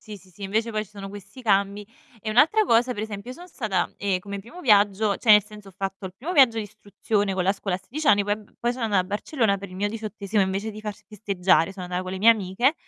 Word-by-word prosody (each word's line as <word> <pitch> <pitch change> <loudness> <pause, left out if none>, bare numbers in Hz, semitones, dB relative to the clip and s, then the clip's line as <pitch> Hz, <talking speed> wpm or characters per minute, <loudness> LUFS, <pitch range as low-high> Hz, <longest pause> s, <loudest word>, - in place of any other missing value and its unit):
Sì, 215 -1 -9
sì, 185 -1 -19
sì, 185 +3 -15
invece 220 +4 -1
poi 215 0 -2
ci 195 - -22
sono 200 -2 -8
questi 205 +6 -11
cambi 200 -1 +1 0.4
e 215 - -4
un'altra 320 - +4
cosa: 245 -2 +3
per 210 - -5
esempio, 215 +1 -6
io 255 - -8
son 355 +1 -12
stata, 220 - -2
ehm, 195 -2 -1
come 200 +1 -6
primo 280 - -11
viaggio 205 - +3
cioè 230 - +1
nel 210 -1 +7
senso 210 -2 -13
ho 190 - -16
fatto 195 0 -4
il 185 - -10
primo 320 - -5
viaggio 255 -7 +5
d'istruzione 205 -1 -2
con 185 - 0
la 195 - +3
scuola 195 -2 -3
a - - -13
16 305 +10 -6
anni, 205 -7 +5
poi 205 +1 0
eb 210 -1 -15
poi 240 0 +1
so' 250 - -10
annà 215 -4 +1
a 185 - +2
Barcellona 205 +1 0
per 200 0 -8
il - - -11
mio 205 +2 -1
diciottesimo 215 -1 -3
invece 195 +3 -2
di 215 - -9
far 210 -1 -5
festeggiare, 195 -4 0
so' 195 - -10
annà 180 0 -3
con 185 0 -6
le 190 - -4
mie 220 - +4
amiche, 225 - +1
205 Hz, 265 wpm, -24 LUFS, 195-225 Hz, 0.4 s, nel